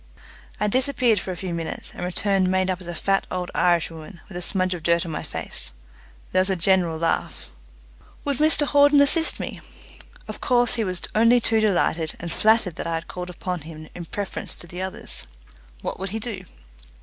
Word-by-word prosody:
I 210 - +1
disappeared 250 -1 +2
for - - -7
a 180 - -5
few 185 -1 -4
minutes, 165 -1 -4
and - - -6
returned 185 +1 +1
made 185 0 +2
up 185 0 -4
as 175 - -11
a 175 - -5
fat 195 +2 +1
old 180 -1 -3
Irish 175 -2 +2
woman, 165 +2 -10
with 190 - -11
a 180 - -3
smudge 185 0 0
of 175 - -6
dirt 170 +2 +2
on 165 - -5
my 150 - -3
face. - - -3 0.6
There 185 - +4
was 190 - +2
a 190 - +2
general 175 -2 +2
laugh. 165 - -2 0.7
Would 285 -2 0
Mr 305 -1 +4
Hawden 285 0 +5
assist 320 +3 +5
me? - - -5 0.7
Of - - -7
course 245 -2 +3
he 230 -2 +1
was 185 -3 -3
only 230 +3 +5
too 225 -1 +2
delighted, 175 -6 +1
and 170 0 -5
flattered 220 -5 +3
that - - -3
I 165 - -1
had 165 +1 -4
called 180 0 -6
upon 180 -1 -4
him 155 0 -10
in 175 - -7
preference 200 +3 -5
to - - -13
the 175 +2 -7
others. 190 - -3 0.6
What - - -4
would 195 +1 -3
he 215 - -3
do? 205 -5 -5
185 Hz, 205 wpm, -24 LUFS, 175-220 Hz, 0.7 s, Hawden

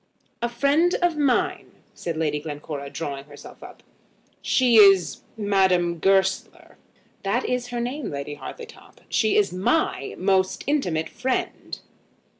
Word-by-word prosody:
"A 240 - 0
friend 285 +8 +2
of 350 -2 +2
mine," 300 +6 0 0.2
said 170 -2 -5
Lady 150 -2 0
Glencora, 145 -2 -6
drawing 140 -3 -5
herself 145 0 -13
up. - - -13 0.6
"She 245 -3 +3
is, 195 -4 +6 0.2
Madame 190 -5 +2
Goesler." 190 +1 0 0.4
"That 205 +6 -1
is 250 -1 -2
her 245 -1 -4
name, 250 +3 -3
Lady 140 +1 -5
Hartletop. 460 - -11
She 220 -2 +2
is 200 -4 +2
my 185 - 0
most 190 0 +1
intimate 180 - 0
friend." 255 +2 -3
195 Hz, 125 wpm, -24 LUFS, 165-250 Hz, 0.6 s, is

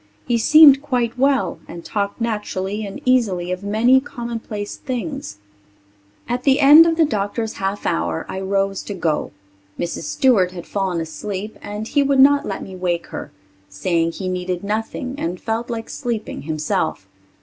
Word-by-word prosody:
He 235 -1 +1
seemed 285 +2 +8
quite 245 -5 -1
well 275 +2 +1
and 170 - -9
talked 200 0 -2
naturally 210 -2 -3
and 195 - -8
easily 200 -9 +2
of 185 0 -3
many 225 +6 +4
commonplace 230 -5 -6
things. 265 - -5 0.9
At 245 +1 -1
the 270 0 +3
end 300 +4 +9
of 325 -1 +1
the 325 - +5
doctor's 215 -2 -2
half 195 +1 -2
hour 80 0 -1
I 190 - -5
rose 195 0 0
to 205 - -5
go. 165 -4 -1 0.5
Mrs. 170 -1 -4
Stewart 200 -9 +2
had 175 -2 -8
fallen 190 -4 -2
asleep 195 +6 -5
and 210 +1 -6
he 285 - +2
would 275 -1 +2
not 285 +1 +5
let 195 - -4
me 190 - -9
wake 175 -2 -1
her, - - -6 0.4
saying 165 - 0
he 190 - -5
needed 180 0 -3
nothing 225 +5 -3
and 175 +2 -3
felt 225 +2 -3
like 225 -1 -4
sleeping 235 -5 -4
himself. 155 0 -2
210 Hz, 160 wpm, -20 LUFS, 185-250 Hz, 0.9 s, end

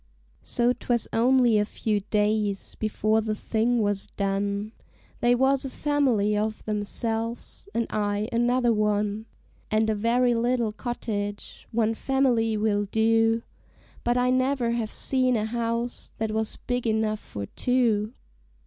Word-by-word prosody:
So 240 +1 +1
'twas 240 -2 -1
only 240 -1 +4
a - - +3
few 210 0 -1
days 210 0 0
before 215 0 0
the 215 -1 -2
thing 225 +2 0
was 205 -1 0
done 200 +1 -2 0.5
They 240 0 +4
was 265 +2 +2
a 270 - -4
family 255 -8 +1
of 215 +1 -2
themselves, 225 - -3
and 235 - +1
I 205 0 -1
another 240 0 +2
one; 210 0 0 0.4
And 220 0 +2
a - - +2
very 240 +3 +2
little 235 -1 +1
cottage 210 -3 -5
one 225 -1 +1
family 235 -3 +1
will 210 -1 +1
do, 225 +2 +2 0.6
But 240 +1 +1
I 250 0 +2
never 255 -2 +1
have 230 -2 -2
seen 255 -2 +1
a 215 -1 0
house 235 +1 -3
that 220 -1 -2
was 220 0 -2
big 245 -1 -2
enough 220 -1 +1
for 100 - -7
two. 230 - +1
225 Hz, 140 wpm, -26 LUFS, 210-240 Hz, 0.6 s, only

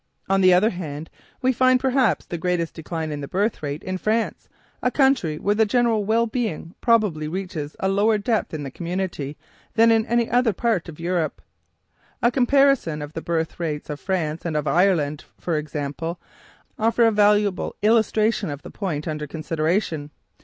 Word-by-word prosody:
On 195 0 +2
the 185 -1 +6
other 190 +6 +4
hand, 160 -4 -6 0.3
we 260 +1 +3
find 255 +1 +4
perhaps 255 - +2
the 170 - -5
greatest 175 -1 -1
decline 160 -1 -4
in 145 -1 -4
the 140 - -5
birth 205 +7 -1
rate 145 0 -4
in 185 0 -3
France, 220 +3 -1 0.3
a 250 - +2
country 260 - +2
where 205 +6 +1
the 220 +1 +3
general 230 -1 +2
well 225 +3 +2
being 220 -8 -3
probably 210 -10 +2
reaches 165 -4 -5
a 190 - 0
lower 205 +3 +3
depth 215 +1 -1
in 155 -2 -4
the 135 - -6
community 170 -4 -4 0.4
than 230 0 +6
in 225 -1 +2
any 235 0 +2
other 245 -2 +2
part 215 -5 0
of 155 - -11
Europe. 170 -2 -1 0.8
A 240 - +5
comparison 260 - +3
of 145 +1 -9
the 165 - -4
birth 165 0 -2
rates 150 -3 -3
of 145 - -5
France 165 -5 -2
and 160 -3 -1
of 150 - -1
Ireland, 160 -4 +2
for 170 - -2
example, 150 +3 -4 0.6
offer 230 +2 +3
a 225 - +5
valuable 205 -2 +2
illustration 220 -2 +2
of 145 0 -6
the - - -9
point 165 -7 -3
under 150 -1 -3
consideration. 160 0 -1
185 Hz, 175 wpm, -23 LUFS, 155-225 Hz, 0.8 s, the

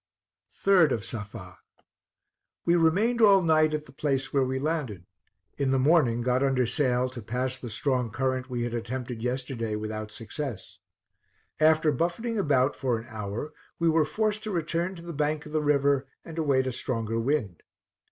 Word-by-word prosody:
3d 185 -5 +6
of 115 -5 -2
Safa. 100 -5 -7 1.1
We 170 - +4
remained 200 +9 +3
all 200 -3 +7
night 155 -1 +3
at 150 0 -4
the - - -15
place 135 -1 -1
where 140 - +3
we 130 0 -1
landed; 135 - -2 0.5
in 140 -1 +1
the 135 - +3
morning 130 -4 +3
got 125 +1 +1
under 135 -2 +2
sail 125 0 +1
to 125 -2 -8
pass 125 +4 -3
the 120 - -7
strong 125 +3 0
current 130 +3 -2
we 120 -1 -2
had 120 -1 -3
attempted 120 0 -4
yesterday 125 -3 -2
without 110 0 -4
success. 115 -1 -6 0.8
After 155 0 +4
buffeting 175 - -1
about 140 -6 +2
for 125 -4 0
an 115 - -8
hour 110 +7 -5 0.2
we 170 0 +2
were 160 0 +4
forced 215 +5 -1
to - - -3
return 170 +1 -1
to 170 - -11
the 170 0 -6
bank 150 +1 -1
of 150 - -10
the 155 0 +1
river, 140 -2 +2 0.2
and 165 0 -6
await 140 -4 +2
a 130 - -1
stronger 115 -2 -2
wind. 115 - -1
135 Hz, 170 wpm, -27 LUFS, 120-155 Hz, 1.1 s, all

